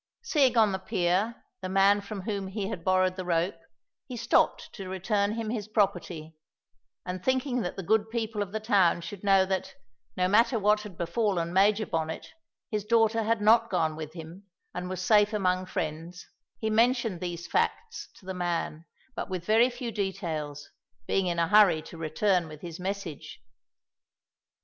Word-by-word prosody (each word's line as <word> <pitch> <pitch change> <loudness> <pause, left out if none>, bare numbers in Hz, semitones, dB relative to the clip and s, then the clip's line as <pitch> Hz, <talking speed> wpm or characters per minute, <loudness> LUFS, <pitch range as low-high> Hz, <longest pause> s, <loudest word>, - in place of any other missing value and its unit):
Seeing 280 - +2
on 215 -2 +5
the 190 - -2
pier 190 +3 -1 0.2
the 185 - -4
man 195 +2 +4
from 200 0 -6
whom 200 0 -3
he 195 0 -4
had 175 -6 -6
borrowed 185 0 +2
the 185 - -3
rope, 175 +1 0 0.5
he 250 - -6
stopped 230 +1 +1
to 195 -4 -7
return 200 +2 0
him 225 -1 -3
his 215 -4 -3
property, 175 -7 -1 0.7
and 180 0 -5
thinking 260 -1 0
that 180 - -4
the 195 - -5
good 220 +4 +2
people 220 -2 -2
of 200 -2 -3
the 220 - -2
town 200 -6 +3
should 180 +4 -8
know 195 -1 +5
that, 190 -1 -3 0.4
no 180 - +2
matter 230 +5 +4
what 210 0 +3
had 205 -5 -10
befallen 175 -2 -1
Major 205 +3 +3
Bonnet, 160 -2 -4 0.4
his 210 -2 -1
daughter 225 +1 +3
had 225 0 0
not 230 +2 +5
gone 160 -4 0
with 155 0 -7
him 170 +4 -10 0.3
and 180 +1 -5
was 185 0 -4
safe 210 +1 +4
among 185 -2 0
friends, 165 +3 -5 0.3
he 220 -1 -2
mentioned 230 -4 +2
these 175 -1 -4
facts 460 0 -2
to - - -18
the 190 - -4
man, 170 -3 -3 0.3
but - - -4
with 180 -2 -4
very 225 +3 +4
few 245 -1 -5
details, 165 -8 -4 0.3
being 190 +7 +1
in 170 -1 -1
a 170 0 +2
hurry 195 -5 +5
to - - -11
return 165 +3 0
with 155 -1 -11
his 170 -1 -8
message. 180 -6 -5
195 Hz, 175 wpm, -28 LUFS, 175-215 Hz, 0.7 s, on